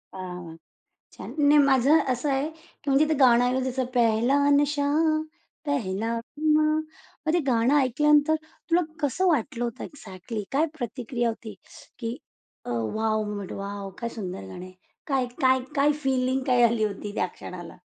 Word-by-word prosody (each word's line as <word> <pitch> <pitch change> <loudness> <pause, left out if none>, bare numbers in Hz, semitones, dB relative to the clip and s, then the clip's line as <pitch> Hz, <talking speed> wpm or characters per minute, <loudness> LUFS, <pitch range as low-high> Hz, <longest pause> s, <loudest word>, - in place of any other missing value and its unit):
हां. 180 -3 -7 0.6
छान. - - -9
नाही 295 0 +5
माझं 275 +3 +5
असं 250 +4 -1
आहे, 275 +3 0
की 320 -2 -11
म्हणजे 275 +3 +4
ते - - +3
गाणं 245 -2 +6
आहे 250 +1 +1
तसं 260 0 -1
पेहेला 235 +2 +3 0.2
नशा, 290 0 +1 0.8
पेहेला 230 -5 -1
खुमार. 305 +4 +1 0.5
मग 315 - +2
ते 350 - +3
गाणं 240 +1 +3
ऐकल्यानंतर 295 +4 +3
तुला 335 +2 -1 0.2
कसं 310 +6 +1
वाटलं 265 -6 0
होतं 235 -2 -4
एक्झाक्टली? 210 -4 -7
काय 285 +4 +2
प्रतिक्रिया 240 -1 -2
होती 220 -1 -7 0.4
की 230 +1 -4 0.5
अ, - - -6
वॉव! 215 - -1 0.2
But 195 - -7
wow! 200 0 -5
काय 235 - -3
सुंदर 190 - -6
गाणं 95 - -8
आहे. 185 - -13 0.3
काय 270 -3 +1 0.2
काय 260 0 +4 0.2
काय 285 +1 +4
फीलिंग 260 0 +1
काय 250 -2 +4
आली 235 -1 +3
होती 205 0 -3
त्या - - +1
क्षणाला? 175 -1 -10
250 Hz, 155 wpm, -26 LUFS, 220-285 Hz, 0.8 s, गाणं